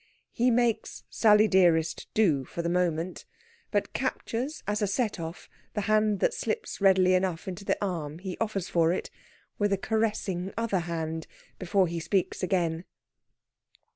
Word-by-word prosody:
He 245 +2 +2
makes 240 -2 0
"Sally 215 -1 +5
dearest" 170 -4 +3
do 165 -11 +3
for 170 +6 -5
the 170 - 0
moment, 175 0 -1 0.5
but - - -1
captures 260 +7 -3
as 210 +1 -1
a 205 - +2
set 215 -1 -1
off 165 +1 -7 0.3
the 210 - 0
hand 215 -1 +2
that - - +3
slips 455 - -3
readily 190 -2 +5
enough 185 -2 0
into 190 +1 -5
the - - 0
arm 160 -5 -4
he 185 +1 -5
offers 210 -5 -2
for 165 -1 +3
it, 180 - -3 0.5
with 205 -1 +2
a 195 - +2
caressing 200 -4 -1
other 230 -5 0
hand, 160 -1 -4 0.3
before 190 +1 +2
he 170 -1 -3
speaks 185 +3 -1
again. 175 -3 0
190 Hz, 155 wpm, -28 LUFS, 170-215 Hz, 0.5 s, Sally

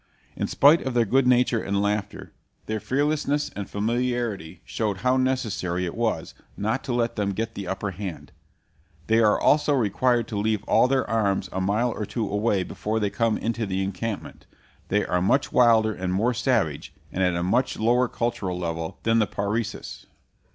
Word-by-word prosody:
In - - -2
spite 150 +4 +5
of 130 -2 -4
their 120 -1 +4
good 130 +4 +2
nature 125 -2 +3
and 100 0 -1
laughter, 100 0 -2 0.3
their 110 0 -2
fearlessness 145 +2 0
and 100 -1 -5
familiarity 110 -6 -2
showed 105 -4 -2
how 125 +1 +4
necessary 110 -9 -1
it 85 - -4
was 115 -1 -2 0.2
not 110 +6 -1
to - - -3
let 120 -1 0
them 100 -1 0
get 115 +3 -3
the 100 -3 -6
upper 95 +2 -3
hand. 80 -6 -7 0.7
They 110 +1 +3
are 110 -2 +4
always 150 - +3
required 125 -2 +2
to 105 - -2
leave 105 0 0
all - - +4
their 135 0 +1
arms 105 -4 0
a 95 - -2
mile 105 +6 +1
or 105 -2 -4
two 115 -4 -2
away 105 -1 +1
before 110 +4 -3
they 105 -2 -1
come 115 -2 +1
into 115 -1 -2
the 95 0 -1
encampment. 100 +3 -5 0.4
They 105 +1 +1
are 90 - 0
much 130 +10 +1
wilder 115 -3 +4
and 95 -2 -3
more 110 +7 +1
savage, 115 - -1 0.2
and 95 - -3
at 90 -1 +2
a 85 - -1
much 120 +8 +1
lower 120 +3 +3
cultural 115 -8 -2
level, 80 -2 -4
than 115 0 +3
the 105 - +2
Parecis. 105 +3 -4
110 Hz, 180 wpm, -25 LUFS, 100-120 Hz, 0.7 s, spite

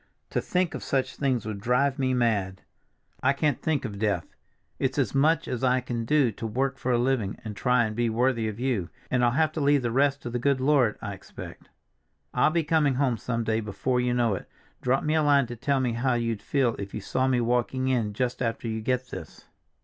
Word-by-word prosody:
To - - 0
think 180 -2 0
of - - -5
such 135 -2 -1
things 130 -6 0
would 105 -2 -5
drive 130 +4 +1
me 130 -1 +1
mad. 100 -6 0 0.6
I 135 +2 +3
can't 145 -1 0
think 155 -4 0
of 100 -4 -5
death. 105 -1 -1 0.4
It's 135 +1 -1
as 130 -8 +1
much 155 +4 +3
as 125 0 -3
I 130 0 +3
can 120 -2 -4
do 140 -2 +3
to 110 +2 -5
work 130 +4 -1
for 125 - -1
a 120 - +3
living, 120 -5 0
and 105 -1 -5
try 125 +2 +2
and 110 -1 -4
be 120 0 +1
worthy 115 0 +1
of 110 +1 -5
you, 120 -9 -1 0.2
and 125 -1 +2
I'll 120 - +5
have 155 +5 +2
to 155 - -3
leave 140 -1 +3
the 120 - 0
rest 140 +2 +2
to 120 - -5
the 120 - -2
good 140 +1 +2
Lord, 130 -5 +3
I 100 - -3
expect. 95 0 -11 0.6
I'll - - +4
be 165 +1 +1
coming 150 -4 +2
home 130 -3 +1
some 115 +2 -2
day 110 0 0
before 125 +4 -1
you 125 0 0
know 120 -3 +2
it—drop 125 +7 -3
me 155 - +1
a 160 - +3
line 145 -2 +4
to 120 0 -7
tell 140 +4 0
me 125 -3 0
how 125 +2 +1
you'd 115 -3 -1
feel 130 0 +1
if 100 0 -6
you - - -3
saw 130 +6 0
me 130 -2 +2
walking 125 +2 0
in 115 -5 0
just 125 +1 -2
after 115 -1 -2
you 110 0 -2
get 125 +2 -1
this." - - -9
125 Hz, 230 wpm, -27 LUFS, 115-135 Hz, 0.6 s, I'll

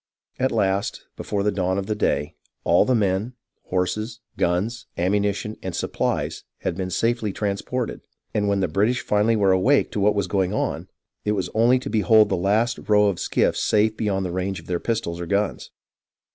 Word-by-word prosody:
At 130 +1 +1
last, 100 -3 0
before 100 -1 -2
the 105 - +2
dawn 95 -1 0
of 100 - -2
the 110 - -1
day, 75 -7 0 0.3
all 85 - +4
the 130 - +2
men, 105 +3 0 0.3
horses, 110 +5 -2 0.2
guns, 100 +7 -1
ammunition, 100 +3 0
and 95 -3 -4
suppHes - - -2 0.2
had - - -2
been 95 -1 -3
safely 115 +3 0
trans 100 0 -2
ported; 125 -2 -3 0.3
and 105 -1 +1
when 100 -1 +1
the 95 - +2
British 105 +10 +1
finally 105 +2 +2
were 100 -3 +3
awake 120 +10 +3
to - - -2
what 105 +1 +3
was 100 -2 +1
going 95 +1 0
on, 80 -2 -2 0.4
it 105 - +1
was 95 -3 -2
only 120 +3 +4
to 130 +2 -5
behold 110 0 +5
the 95 - +1
last 105 +6 +1
row 105 -1 +5
of 95 - -3
skiffs - - +1
safe 110 +1 +2
beyond 100 -4 -1
the 90 - -3
range 95 +1 -2
of 80 - -15
their 90 -1 -2
pistols 85 -7 -2
or 85 - -5
guns. 100 +2 -1
100 Hz, 190 wpm, -23 LUFS, 95-110 Hz, 0.4 s, behold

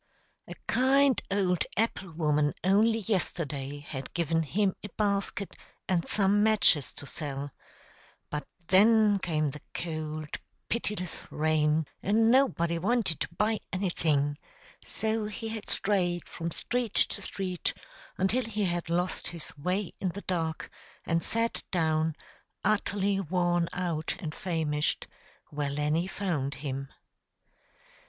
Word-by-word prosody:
A - - -7
kind 270 +1 +4
old 190 -3 +2
apple 205 -4 0
woman 150 -2 +1
only 215 +4 +4
yesterday 150 -8 -1
had 135 -2 -6
given 165 -1 +2
him 190 +5 +1
a 205 - -5
basket, 200 -1 0 0.3
and 175 -3 +2
some 205 0 +3
matches 180 -10 +4
to - - -5
sell; 140 -1 -3 0.8
but 150 0 -3 0.2
then 210 +1 +6
came 155 -5 0
the 150 - -9
cold, 155 -2 -4 0.3
pitiless 210 -6 -2
rain, 155 0 +2 0.2
and 225 +3 +4
nobody 170 -11 +3
wanted 205 -4 +1
to 170 - -4
buy 215 0 +2
anything; 155 -6 +1 0.4
so 220 -1 -1
he 220 +1 -5
had 220 -1 -6
strayed 180 -4 +1
from 170 -1 -4
street 240 +4 -2
to - - +1
street, 185 -3 -2 0.5
until 210 +7 +2
he 210 -2 -1
had 175 -1 -2
lost 175 +2 0
his 170 -2 -8
way 180 +6 -1
in 185 - 0
the 200 +4 -6
dark, 165 -4 -2 0.3
and 165 0 +1
sat 230 +1 +1
down, 160 -2 +1 0.5
utterly 200 -2 +2
worn 175 -1 +1
out 170 -3 -2
and 155 -3 -5
famished, 160 -5 -1 0.5
where 145 -1 -1
Lenny 150 +5 0
found 160 -9 -2
him. 135 -1 -4
175 Hz, 125 wpm, -29 LUFS, 155-205 Hz, 0.8 s, then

